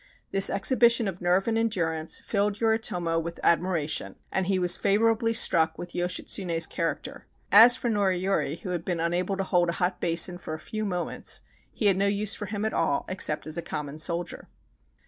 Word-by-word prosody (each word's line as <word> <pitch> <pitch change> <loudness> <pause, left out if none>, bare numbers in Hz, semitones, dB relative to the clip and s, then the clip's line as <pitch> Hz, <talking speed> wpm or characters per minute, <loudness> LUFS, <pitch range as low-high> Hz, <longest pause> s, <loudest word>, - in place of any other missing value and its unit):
This 195 0 +5
exhibition 235 +1 +3
of 185 -1 -6
nerve 180 +3 +1
and 225 0 +1
endurance 165 -8 -1
filled 205 0 -1
Yoritomo 180 -7 0
with 170 +1 -6
admiration, 170 -3 0 0.2
and 190 -1 -1
he 195 -1 +1
was 180 -1 +4
favorably 225 +3 +1
struck 160 -7 +3
with 175 0 -8
Yoshitsune's 175 -1 0
character. 165 0 -5 0.2
As 230 +4 +9
for - - -4
Noriyori, 190 -7 -1
who 185 - -7
had 175 -2 -3
been 175 -2 -3
unable 175 +3 -1
to 195 - -1
hold 175 -2 +1
a - - -1
hot 180 +1 -2
basin 175 +1 +1
for 155 - -6
a - - -10
few 215 +4 -5
moments, 180 -3 -2 0.3
he 220 - -4
had 195 -2 +4
no 200 +1 +1
use 205 +1 0
for 205 - -6
him 205 +1 -4
at 220 - -2
all, 160 -4 0
except 185 -5 0
as 155 +2 -1
a - - -3
common 150 -2 -6
soldier. 170 +2 -3
180 Hz, 185 wpm, -26 LUFS, 170-205 Hz, 0.3 s, As